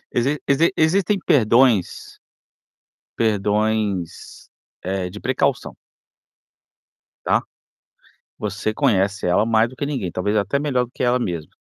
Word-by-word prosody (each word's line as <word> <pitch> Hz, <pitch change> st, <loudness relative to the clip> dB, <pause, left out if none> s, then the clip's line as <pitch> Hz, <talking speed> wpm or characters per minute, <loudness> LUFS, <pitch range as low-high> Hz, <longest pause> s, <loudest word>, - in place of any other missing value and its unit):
Exi 135 Hz, +5 st, +1 dB
exi 145 Hz, +4 st, +3 dB
existem 185 Hz, +5 st, +2 dB
perdões 115 Hz, -5 st, +2 dB, 1.0 s
perdões, 105 Hz, -3 st, -1 dB, 0.3 s
eh, 95 Hz, 0 st, -3 dB
de 105 Hz, +3 st, -9 dB
precaução 130 Hz, +3 st, -1 dB, 1.5 s
tá? -, -, +2 dB, 1.0 s
Você 105 Hz, +1 st, -3 dB
conhece 105 Hz, -8 st, +1 dB
ela 90 Hz, +4 st, +3 dB
mais 115 Hz, 0 st, +3 dB
do 130 Hz, -, -14 dB
que 135 Hz, -, -3 dB
ninguém, 130 Hz, -11 st, -3 dB
talvez 105 Hz, +3 st, -1 dB
até 105 Hz, +7 st, 0 dB
melhor 140 Hz, -4 st, 0 dB
do 120 Hz, -, -14 dB
que -, -, -5 dB
ela 125 Hz, 0 st, +2 dB
mesma. 85 Hz, -9 st, -4 dB
110 Hz, 120 wpm, -21 LUFS, 100-130 Hz, 1.5 s, exi